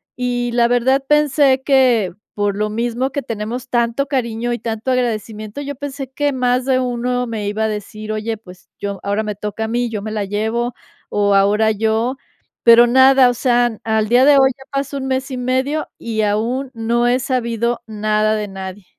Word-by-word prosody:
y 245 -1 -1
la 235 -1 +3
verdad 260 +3 +2
pensé 285 -2 +3
que, 250 -9 +3 0.2
por 205 -1 -1
lo 210 0 0
mismo 240 +4 -2
que 285 - -2
tenemos 230 +2 -5
tanto 240 +3 0
cariño 240 -3 -2
y 235 - -3
tanto 225 +2 -3
agradecimiento, 220 -1 -2
yo 285 0 -5
pensé 270 -1 -6
que 290 +1 0
más 250 0 +1
de 260 -1 +2
uno 250 0 -1
me 220 -3 -4
iba 215 +2 -1
a - - +1
decir: 215 +1 -6
"Oye, 215 +1 -2
pues, 180 -4 -16
yo 200 -1 -4
ahora 200 +2 -1
me 210 -1 -4
toca 210 +2 -4
a - - -3
mí, 240 +1 0
yo 215 -3 -4
me 215 +1 -5
la 210 -2 -2
llevo, 220 +4 -2 0.4
o 205 -1 +1
ahora 210 +3 +3
yo", 220 +4 0 0.5
pero 235 +1 +7
nada, 260 +1 +6
o - - 0
sea, 240 -2 +1
al 220 -1 +1
día 245 +2 +5
de 290 - +7
hoy 265 0 +5
ya 265 - -13
pasó 275 0 -2
un 265 -1 -4
mes 265 +1 -2
y 255 - -4
medio 260 +5 -1
y 225 -2 -2
aún 230 +6 -1
no 235 +1 0
he 245 +1 +2
sabido 235 -2 -1
nada 215 0 0
de 210 -1 -3
nadie. 190 0 -8
235 Hz, 195 wpm, -18 LUFS, 215-255 Hz, 0.5 s, pero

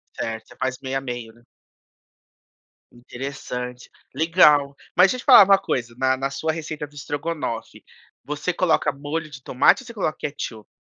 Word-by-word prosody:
Certo, 110 0 -4
você - - -16
faz 130 -1 -2
meio 135 0 -2
a - - -3
meio, 120 -3 -6
né? 120 - -22 1.5
Interessante. 125 0 -7 0.2
Legal. 150 -2 +4 0.2
Mas 180 +1 +6
deixa 255 - -2
eu - - -8
te - - -18
falar - - +9
uma 195 0 +6
coisa, 120 -9 -3
na 130 0 +2
na 135 +1 -2
sua 160 +3 -2
receita 155 -2 -5
do 145 - -20
estrogonofe, 145 -4 -5 0.4
você 150 +5 -3
coloca 175 -1 +2
molho 150 +3 -5
de 140 -2 -11
tomate 130 - +3
ou - - -16
você 235 - -9
coloca 190 -8 -2
ketchup? 115 -7 -6
140 Hz, 170 wpm, -23 LUFS, 125-160 Hz, 1.5 s, falar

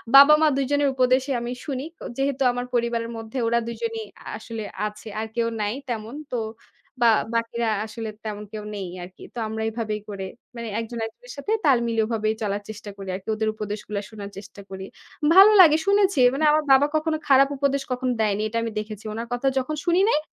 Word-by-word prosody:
বাবা-মা 300 +3 +9
দুজনের 285 +1 +2
উপদেশই 255 +2 +2
আমি 240 +1 -4
শুনি। 275 -2 -3
ক - - -44 0.2
যেহেতু 275 0 -1
আমার 245 0 -3
পরিবারের 235 -1 0
মধ্যে 225 +3 -7
ওরা 235 +1 +3
দুজনই 230 -1 -3 0.2
আ - - -21
আসলে 225 0 -6 0.2
আছে 210 +1 -10
আর 220 - -2
কেউ 235 -1 +1
নাই 210 +1 0 0.2
তেমন 225 +2 -4 0.2
তো 245 - +1 0.6
বা 235 - +7 0.3
বাকিরা 230 0 0 0.2
আসলে 220 0 -6 0.2
তেমন 210 -1 -4
কেউ 215 - -5
নেই 195 -3 -4 0.2
আরকি। 185 +1 -12
তো - - -3
আমরা 220 0 -4
এভাবেই 215 -2 -3
করে 195 -1 -5 0.3
মানে 235 -1 -5
একজন, 230 +1 -5
একজনের - - -13
সাথে 410 +10 -4
তাল 270 -3 +6
মিলিয়ে 225 -1 +1
ওভাবে 215 -2 0
চলার 205 0 -1
চেষ্টা 215 -1 -8
করি 195 -1 -7
আরকি 195 +3 -8
ওদের 220 0 0
উপদেশগুলা 210 -1 -4
শোনার 205 -2 -8
চেষ্টা 200 0 -10
করি। 190 0 -6 0.5
ভালো 395 +3 +10
লাগে 310 -4 +7
শুনেছি 400 -5 +3
মানে 305 +3 +1
আমার 310 0 +3
বাবা 270 +2 +6
কখনো 310 0 +1
খারাপ 275 0 +6
উপদেশ 280 0 +1
কখনো 250 0 0
দেয়নি 210 -1 +1
এটা 230 - -3
আমি 230 - -3
দেখেছি। 215 0 -7
ওনার 230 +2 -4
কথা 245 +3 -1
যখন 285 +4 -3
শুনি 345 +1 +3
নাই, 300 - +3
230 Hz, 195 wpm, -24 LUFS, 215-275 Hz, 0.6 s, ভালো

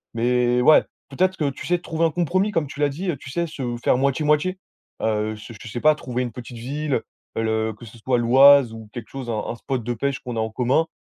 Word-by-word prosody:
Mais 125 +1 +2
ouais, 155 +5 +6 0.3
peut-être 185 +7 +1
que 145 -3 0
tu 135 - -8
sais 175 - +2
trouver 165 -1 -1
un 165 - +2
compromis 185 +5 +1
comme 165 -6 0
tu 135 - -10
l'as 145 -1 +3
dit, 175 +7 -4
heu, 155 - -1
tu 135 - -11
sais 170 +5 -1
se 130 -6 -4
faire - - +3
moitié, 140 +3 +1
moitié. 150 +5 +2 0.4
Heu, 110 0 0
se 110 +2 -11
je - - -10
sais 120 +2 -5
pas 155 - +6
trouver 125 -3 -3
une 120 - -4
petite 120 +1 -9
ville, 140 +1 -2 0.4
heu, 115 - 0
le 110 0 0
que 115 +3 -13
ce 115 +1 -13
soit 125 +2 +1
l'Oise 130 +1 +6
ou 110 -1 -10
quelque 120 -3 -8
chose, 135 -3 -7
un 115 - -1
un - - -3
spot 125 0 -3
de 120 - -2
pêche 135 +4 -1
qu'on 120 -3 -5
a - - 0
en 110 0 -1
commun, 130 +8 +1
130 Hz, 255 wpm, -23 LUFS, 115-150 Hz, 0.4 s, ouais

